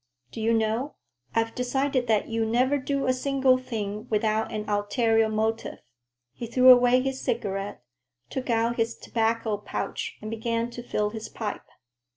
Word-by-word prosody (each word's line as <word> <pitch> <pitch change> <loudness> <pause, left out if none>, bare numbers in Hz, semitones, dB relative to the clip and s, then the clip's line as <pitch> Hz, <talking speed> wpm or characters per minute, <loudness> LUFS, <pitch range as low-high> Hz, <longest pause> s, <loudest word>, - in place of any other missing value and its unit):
Do 225 - -6
you 225 +1 +2
know, 225 +5 0 0.4
I've 225 0 +1
decided 255 0 0
that 220 -2 +2
you 225 0 -1
never 250 +5 +2
do 275 +1 -1
a 255 - +3
single 265 0 +2
thing 215 -3 -5
without 220 0 +1
an 215 0 -4
ulterior 220 +2 +2
motive." 220 +1 -1 0.6
He 235 - -6
threw 255 +2 +7
away 250 0 +6
his 265 0 -3
cigarette, 195 - -3 0.4
took 260 - -5
out 230 +1 +1
his 230 0 0
tobacco 225 -1 0
pouch 460 - -4
and 215 - -6
began 230 +1 -2
to 240 - -7
fill 210 -3 -1
his 220 0 -6
pipe. 215 -3 -5
230 Hz, 160 wpm, -26 LUFS, 220-255 Hz, 0.6 s, threw